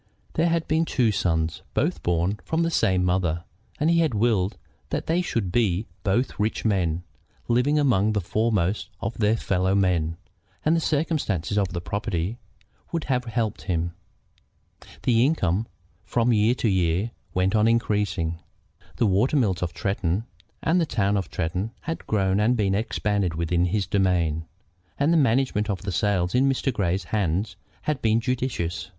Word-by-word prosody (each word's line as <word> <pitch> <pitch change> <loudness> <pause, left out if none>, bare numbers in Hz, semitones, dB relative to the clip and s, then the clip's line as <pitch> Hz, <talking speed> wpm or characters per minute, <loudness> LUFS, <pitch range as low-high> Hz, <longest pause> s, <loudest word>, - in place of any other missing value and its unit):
There 165 +2 +2
had 165 -1 0
been 155 +1 +2
the - - -5
two 120 -5 +2
sons, 80 -4 0
both - - 0
born 90 +4 0
from 160 +1 0
the 165 - 0
same 95 - +2
mother, 90 -2 0 0.4
and 150 - +2
he 170 0 +4
had 160 -8 +2
willed 105 -3 +1 0.3
that - - -2
they 170 +3 +1
should 115 - -2
be 105 -2 +1 0.2
both 105 +6 0
rich 110 +2 -1
men, 90 -5 +1 0.4
living 125 +6 +2
among 110 -8 +3
the 105 - +1
foremost 105 -1 0
of 115 - -3
their 110 +1 +3
fellowmen, 90 -4 +1 0.5
and 155 +2 +4
the - - +2
circumstances 145 - 0
of 100 -2 +2
the 85 0 -3
property 100 +2 -2 0.5
would 165 -2 -1
have 125 -2 0
helped 115 -2 -2
him. 85 -2 -1 1.1
The 120 -1 +4
income 110 - +1 0.4
from 120 0 +1
year 110 +3 +3
to 120 - -1
year 95 +2 +1 0.2
went 95 +1 +2
on 110 0 +4
increasing. 105 -7 0 0.6
The - - +2
water 105 +9 +2
mills 95 -8 +1
of 85 -2 -1
Tretton 95 0 -1 0.4
and 175 +2 +3
the 165 - 0
town 105 -5 +1
of 95 -4 -2
Tretton 90 +8 -2
had 165 +1 -5
grown 95 -2 +1
and 120 +4 +3
been 100 -3 +1
expanded 100 -4 0
within 85 +1 +1
his 100 +2 0
domain, 85 -5 +1 0.5
and 145 +4 +3
the - - +4
management 125 -6 +2
of 100 -2 -2
the 95 - -2
sales 90 -1 +1
in 135 +2 +4
Mr. 135 0 0
Grey's 95 -3 0
hands 95 0 -1 0.3
had 150 -4 -1
been 110 0 +3
judicious. 115 -9 -2
105 Hz, 165 wpm, -25 LUFS, 90-120 Hz, 1.1 s, he